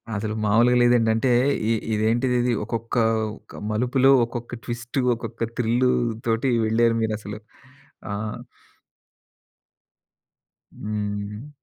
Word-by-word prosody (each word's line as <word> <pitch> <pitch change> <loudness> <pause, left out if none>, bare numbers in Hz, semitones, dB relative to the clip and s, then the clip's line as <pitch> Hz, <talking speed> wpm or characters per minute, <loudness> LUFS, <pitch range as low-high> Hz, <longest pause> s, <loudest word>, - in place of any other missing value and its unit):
అసలు 110 +1 -3
మాములుగా 120 +4 +4
లేదండి. 120 -2 +4
అంటే 125 +3 +1 0.4
ఇ - - +4 0.2
ఇదేంటిదిది 120 +3 +1
ఒక్కొక్క 115 +2 -4 0.4
ఒక్క - - -13
మలుపులో, 125 +4 +3
ఒక్కొక్క 120 0 -7
ట్విస్ట్, 120 +2 -4 0.2
ఒక్కొక్క 115 0 -5
థ్రిల్‌తోటి 120 0 +1
వెళ్లారు 115 +1 +2
మీరసలు. 105 -1 -3 0.7
ఆ! - - -2 2.6
హ్మ్. 105 +3 -4
115 Hz, 90 wpm, -23 LUFS, 110-120 Hz, 2.6 s, మాములుగా